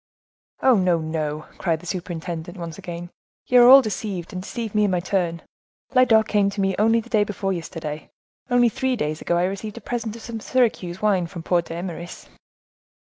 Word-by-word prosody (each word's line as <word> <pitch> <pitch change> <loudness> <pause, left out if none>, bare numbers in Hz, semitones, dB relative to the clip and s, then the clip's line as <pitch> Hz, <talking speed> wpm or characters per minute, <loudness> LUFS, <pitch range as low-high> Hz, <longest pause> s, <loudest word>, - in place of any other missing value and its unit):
"Oh! 255 -4 +6
no, 180 -3 +3
no!" 155 -1 -3
cried 165 -3 0
the 180 - -14
superintendent, 175 0 -5
once 170 -3 -7
again; 175 0 -7 0.3
"you 250 -1 +6
are 240 - +8
all 270 +1 +10
deceived, 195 -4 -4
and 185 - -4
deceive 225 +2 -5
me 210 -1 +3
in - - +1
my 180 -1 +1
turn; 175 -2 -1 0.5
Lyodot 230 -4 +5
came 205 -2 +2
to 200 - -8
see 205 - -1
me 195 -1 +1
only 225 +2 +4
the 230 - -15
day 215 -3 +4
before 195 -1 -2
yesterday; 160 -3 -6 0.4
only 245 -1 +4
three 260 +3 0
days 155 -7 -3
ago 175 - 0
I 175 - +2
received 200 +4 -3
a - - -7
present 230 -3 -4
of 230 - -11
some 230 -1 -5
Syracuse 215 -7 0
wine 190 -5 +2
from 170 -2 -8
poor 175 0 +2
D'Eymeris." 170 +1 -7
190 Hz, 195 wpm, -23 LUFS, 170-220 Hz, 0.5 s, all